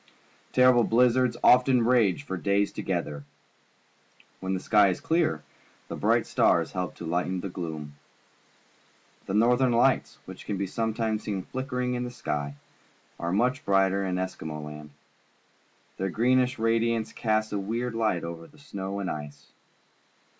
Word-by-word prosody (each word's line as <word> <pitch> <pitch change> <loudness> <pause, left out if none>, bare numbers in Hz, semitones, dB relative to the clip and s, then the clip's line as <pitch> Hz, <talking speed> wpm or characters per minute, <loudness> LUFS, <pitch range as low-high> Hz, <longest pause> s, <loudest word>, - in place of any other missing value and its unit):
Terrible 125 -1 +5
blizzards 125 +2 +3
often 125 -1 +5
rage 115 -3 +3
for 110 -10 -4
days 100 +2 +1
together. 70 -1 -3 1.2
When 95 0 -2
the - - -2
sky 105 +1 +4
is 90 - -2
clear, 160 - 0 0.5
the - - -4
bright - - +2
stars - - +2
help 90 -1 -4
to 85 - -8
lighten 90 +2 -1
the 100 - -5
gloom. 80 -5 -6 1.3
The 95 - -2
Northern 120 +3 +3
Lights, 125 +3 +2
which - - -11
we 100 - -2
can 100 - -1
sometimes 110 +2 -2
see 100 -2 -2
flickering 125 +1 -3
in 125 0 -2
the 125 - -4
sky, 75 -11 -4 0.6
are 85 0 -2
much 125 +7 +1
brighter 95 0 +2
in 95 -1 -1
Eskimo 80 -5 -4
Land. 75 0 -9 1.1
Their 95 0 -1
greenish 125 +5 +2
radiance 115 0 0
casts 110 -1 0
a 100 - 0
weird 115 +5 -3
light 110 -7 0
over 85 0 -7
the - - -21
snow 100 -9 -6
and 95 - -3
ice. 75 -2 -7
105 Hz, 145 wpm, -27 LUFS, 90-125 Hz, 1.3 s, Terrible